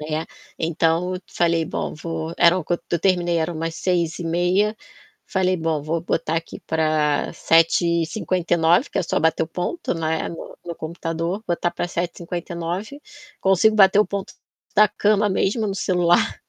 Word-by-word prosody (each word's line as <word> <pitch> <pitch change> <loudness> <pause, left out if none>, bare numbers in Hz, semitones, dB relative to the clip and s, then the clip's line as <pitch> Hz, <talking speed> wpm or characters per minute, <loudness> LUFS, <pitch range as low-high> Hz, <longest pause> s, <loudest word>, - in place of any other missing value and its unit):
Né, 155 +1 -3 0.3
então 165 +2 +1
eu 180 - -5
falei: 170 -1 +1
"Bom, - - -3
eu - - -9
vou" 160 +1 -5
era 170 +2 +5
o 175 - -5
quando 175 +2 -1
eu 170 - +1
terminei 175 -1 +1
era 160 +1 -1
umas 165 0 -4
6h30, 175 +3 0 0.5
falei: 185 -1 +1
"Bom, 160 -2 -1
vou 160 +3 -1
botar 165 -1 -1
aqui 165 0 -5
pra 155 -2 +1
7h59", 170 - +2
que - - -2
é - - +2
só 170 - -1
bater 160 0 +2
o - - -11
ponto, 180 - -3
né, 160 -1 -1
no 165 - -9
no 170 - -5
computador, 165 +5 -4
botar 175 0 0
pra - - -3
7h59. 175 - -4 0.4
Consigo 195 +3 +4
bater 195 0 +6
o 210 - +2
ponto 200 -1 -5 0.4
da 210 +1 +6
cama 210 +1 +2
mesmo, 205 +3 0
no 195 - -2
celular. 175 -2 +2
170 Hz, 160 wpm, -22 LUFS, 165-185 Hz, 0.5 s, bater